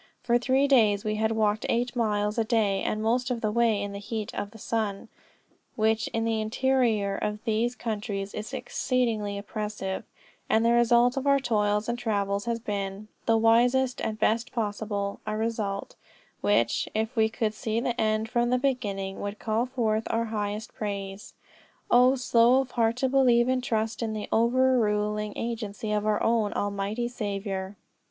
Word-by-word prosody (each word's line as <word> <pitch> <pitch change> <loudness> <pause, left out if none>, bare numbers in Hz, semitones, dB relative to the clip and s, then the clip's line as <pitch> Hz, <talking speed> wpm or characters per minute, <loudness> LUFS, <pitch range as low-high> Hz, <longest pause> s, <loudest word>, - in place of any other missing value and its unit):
For 240 0 +3
three 265 +3 +2
days 215 -7 +4
we 215 0 -1
had 220 +1 +1
walked 215 -1 +1
eight 240 +2 0
miles 210 -1 0
a - - +3
day, 215 -4 +1
the - - -1
most 230 +4 0
of 240 -2 -2
the 215 - 0
way 230 -2 +2
in 205 - -4
the 200 - -6
heat 215 +1 -5
of 205 - -4
the 225 - -14
sun, 215 -1 -3 0.7
which 220 +1 +1
in 225 0 -2
the 225 -1 0
interior 220 -3 +1
of 210 +1 -2
these 230 +2 0
countries 205 -4 -4
is 215 +3 -6
exceedingly 240 -5 -1
oppressive; 205 -2 -4 0.5
and 225 +1 +3
the 235 - +4
result 240 +2 +4
of 270 +1 -1
our 280 0 +5
toils 210 -4 0
and 240 0 -2
travels 200 -3 -1
has 235 -1 -1
been 200 -1 -4 0.2
the 225 0 +4
wisest 245 +3 +3
and 215 -1 -2
best 225 +2 +1
possible 205 -3 -3
a 215 0 -1
result, 215 -3 -2 0.5
which, 115 +3 +1
if 220 +3 -1
we 220 -1 +3
could 220 -1 -1
see 220 +1 -2
the 240 0 -1
end 215 0 +1
from 240 +1 +1
the 250 - +3
beginning, 205 -8 -2
would 205 +1 -4
call 225 +3 -1
forth 225 -4 -1
our 230 0 0
highest 210 -1 -4
praise. 200 -1 -5 0.6
O 250 +2 +6
slow 245 0 +4
of 260 -2 -7
heart 230 -1 +1
to 265 +2 0
believe 250 -3 +4
and 255 -1 +1
trust 220 -1 -1
in 225 -2 -2
the 215 -1 -4
over 255 +3 +3
ruling 210 -1 0
agency 220 -2 -4
of 210 0 0
our 210 -1 +1
own 225 -2 +2
Almighty 205 +4 -2
Saviour!" 200 -4 -4
220 Hz, 175 wpm, -27 LUFS, 210-240 Hz, 0.7 s, O